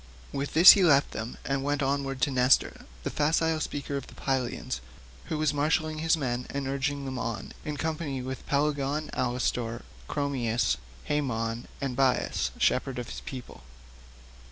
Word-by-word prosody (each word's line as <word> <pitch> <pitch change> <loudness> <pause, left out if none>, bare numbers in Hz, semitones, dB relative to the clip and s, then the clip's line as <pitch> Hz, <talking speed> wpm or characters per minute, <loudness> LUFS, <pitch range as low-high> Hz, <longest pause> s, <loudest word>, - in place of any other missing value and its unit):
With 140 +1 -3
this 170 +4 +12
he 195 - +5
left 145 -5 +5
them 110 +2 -5
and 135 0 -1
went 145 0 0
onward 135 -1 -1
to 145 - +2
Nestor, 125 0 +3 0.2
the - - -2
facile 160 +1 +2
speaker 140 -2 -3
of 135 - -6
the - - -14
Pylians, 125 - -2 0.4
who 155 - -3
was 155 -1 +1
marshalling 155 +1 0
his 165 +1 +3
men 125 -4 -2
and 140 -1 -3
urging 140 +1 -1
them 130 -1 -4
on, 115 -3 -4
in 150 -1 -4
company 155 -4 -2
with 130 0 -6
Pelagon, 145 +1 0
Alastor, 120 -2 -1 0.3
Chromius, 120 - 0 0.3
Haemon, 115 -5 -1
and 135 -3 -2
Bias 130 -1 +1
shepherd 135 - +1
of 120 -1 -5
his - - -6
people. 125 - -8
140 Hz, 155 wpm, -28 LUFS, 125-150 Hz, 0.4 s, this